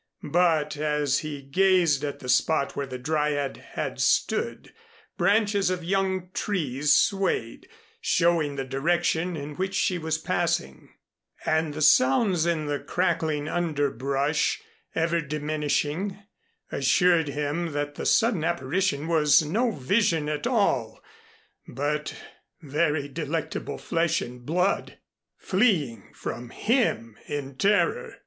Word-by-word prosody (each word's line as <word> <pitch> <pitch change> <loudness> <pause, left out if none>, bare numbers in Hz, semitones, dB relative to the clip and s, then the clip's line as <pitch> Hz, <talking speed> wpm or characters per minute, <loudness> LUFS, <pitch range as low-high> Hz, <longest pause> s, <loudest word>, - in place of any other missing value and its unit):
But 160 -3 +2
as 150 -2 +1
he 145 -3 -6
gazed 170 -1 +3
at 145 -1 -3
the 125 - -8
spot 140 +3 +2
where 140 - -3
the 130 0 -6
Dryad 145 0 -1 0.2
had - - -3
stood, - - 0 0.4
branches 200 +1 +2
of 180 -2 -2
young 190 0 -1
trees 150 -8 -1
swayed, 195 -2 +1 0.3
showing 165 - +2
the 135 -1 -3
direction 170 +5 0
in 145 0 -7
which 190 +1 -2
she 180 -2 +1
was 160 -1 -1
passing 160 - -2 0.6
and 155 -1 0
the 155 - -1
sounds 160 - +4
in 165 -3 0
the 145 -1 -2
crackling 160 -4 -1
underbrush, 145 -3 0 0.4
ever 170 +1 +1
diminishing, 150 +5 -2 0.5
assured 175 -4 +3
him 150 +4 -2
that 145 0 -2
the - - -4
sudden 225 -8 +3
apparition 165 0 0
was 155 -2 +4
no 220 +11 +1
vision 170 - +1
at 150 +9 -2
all, 140 - +1 0.7
but 150 +3 -2 0.4
very 150 -1 0
delectable 155 +2 -4
flesh 165 0 0
and 120 0 -8
blood, 180 +5 0 0.4
fleeing 175 - 0
from 120 0 -6
him 205 - 0
in 140 -2 -5
terror. 210 - +1
155 Hz, 120 wpm, -26 LUFS, 145-180 Hz, 0.7 s, sounds